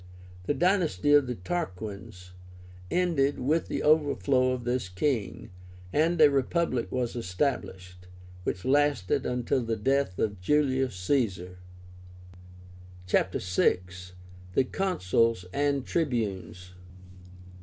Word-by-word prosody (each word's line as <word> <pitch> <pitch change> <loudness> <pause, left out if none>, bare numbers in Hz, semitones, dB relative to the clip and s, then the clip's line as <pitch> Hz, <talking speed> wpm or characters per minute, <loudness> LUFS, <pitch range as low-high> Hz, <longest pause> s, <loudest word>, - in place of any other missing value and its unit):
The 145 - 0
dynasty 170 - +2
of 145 -3 +5
the 125 - -3
Tarquins 100 - -6 0.6
ended 160 -6 +1
with 155 +6 0
the - - -3
overthrow 145 -4 +3
of 130 -1 -2
this 120 -5 -2
king, 100 0 -2 0.4
and 165 +3 +2
a 150 -2 +7
Republic 135 -1 0
was 125 -2 -2
established, 90 -5 -3 0.3
which 90 0 -4
lasted 140 -7 +1
until 125 +1 0
the 115 0 -1
death 135 -3 0
of 100 -4 -2
Julius 130 0 +1
Caesar. 90 -4 -1 1.5
CHAPTER 90 0 +1
VI. 90 0 +2 0.8
THE - - +4
CONSULS 115 - 0
AND 140 -2 0
TRIBUNES. 105 - -2
125 Hz, 105 wpm, -28 LUFS, 95-145 Hz, 1.5 s, a